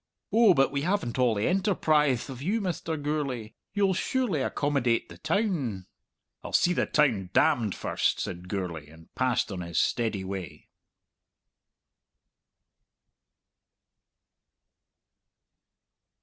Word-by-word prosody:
"Oh, 220 Hz, -5 st, +6 dB
but 135 Hz, -, +3 dB
we 140 Hz, 0 st, -1 dB
haven't 165 Hz, -, -1 dB
all 120 Hz, -3 st, +3 dB
the 100 Hz, -, 0 dB
enterprithe 155 Hz, -, +2 dB
of 130 Hz, -2 st, -8 dB
you, 200 Hz, +10 st, 0 dB
Mr. 170 Hz, -5 st, -3 dB
Gourlay. 140 Hz, -7 st, -3 dB, 0.2 s
You'll 195 Hz, -1 st, +2 dB
surely 220 Hz, -, 0 dB
accommodate 130 Hz, -4 st, 0 dB
the -, -, -12 dB
town!" 155 Hz, -, -1 dB, 0.6 s
"I'll -, -, -8 dB
see 180 Hz, -, +4 dB
the -, -, 0 dB
town 115 Hz, -12 st, +2 dB
damned 120 Hz, -, +3 dB
first," -, -, 0 dB
said 90 Hz, +1 st, -5 dB
Gourlay, 90 Hz, -6 st, -4 dB
and 80 Hz, +1 st, -17 dB
passed 125 Hz, -3 st, 0 dB
on 95 Hz, -2 st, -4 dB
his 85 Hz, -1 st, -2 dB
steady 110 Hz, -5 st, 0 dB
way. 95 Hz, -4 st, -7 dB
135 Hz, 110 wpm, -27 LUFS, 105-170 Hz, 0.6 s, Oh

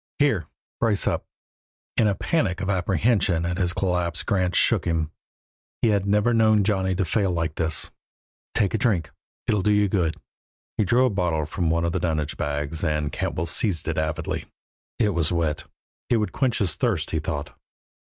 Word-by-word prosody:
"Here! 110 Hz, -, +2 dB, 0.3 s
Brace 105 Hz, -3 st, +2 dB
up!" -, -, 0 dB, 0.7 s
In 110 Hz, -, +3 dB
a 100 Hz, -, +1 dB
panic 100 Hz, -, 0 dB
of 95 Hz, +1 st, -1 dB
apprehension 95 Hz, -1 st, +1 dB
at 90 Hz, 0 st, -2 dB
this 90 Hz, -2 st, +1 dB
collapse 90 Hz, -2 st, -1 dB
Grant 90 Hz, -2 st, 0 dB
shook -, -, +3 dB
him; 80 Hz, -2 st, 0 dB, 0.7 s
he 115 Hz, -, +5 dB
had 100 Hz, -2 st, +1 dB
never 105 Hz, +4 st, +3 dB
known 110 Hz, -2 st, +4 dB
Johnny 95 Hz, -2 st, +1 dB
to 95 Hz, +1 st, 0 dB
fail 100 Hz, +3 st, +1 dB
like 80 Hz, -3 st, -1 dB
this. 80 Hz, -1 st, 0 dB, 0.6 s
"Take 100 Hz, -3 st, +2 dB
a 110 Hz, -, +1 dB
drink; 95 Hz, -10 st, +1 dB, 0.3 s
it'll 105 Hz, -2 st, +1 dB
do 105 Hz, -, +1 dB
you 105 Hz, 0 st, +4 dB
good." 85 Hz, -5 st, 0 dB, 0.6 s
He 110 Hz, -, +1 dB
drew 120 Hz, +7 st, +4 dB
a 125 Hz, -, +2 dB
bottle 90 Hz, -6 st, 0 dB
from 85 Hz, +2 st, -1 dB
one 85 Hz, +1 st, +1 dB
of 85 Hz, -, 0 dB
the -, -, -1 dB
dunnage 80 Hz, -3 st, -1 dB
bags 75 Hz, +2 st, -3 dB
and 75 Hz, -2 st, 0 dB
Cantwell 85 Hz, -, -2 dB
seized 85 Hz, +1 st, 0 dB
it 80 Hz, -1 st, 0 dB
avidly. 80 Hz, 0 st, -2 dB, 0.5 s
It 110 Hz, -3 st, +2 dB
was 85 Hz, -5 st, +1 dB
wet; 80 Hz, -3 st, -1 dB, 0.4 s
it 120 Hz, -, +4 dB
would 105 Hz, -1 st, -1 dB
quench 130 Hz, -4 st, 0 dB
his 90 Hz, -6 st, +2 dB
thirst, 95 Hz, -, 0 dB
he 80 Hz, -, 0 dB
thought. 75 Hz, -1 st, -4 dB
90 Hz, 185 wpm, -24 LUFS, 80-105 Hz, 0.7 s, he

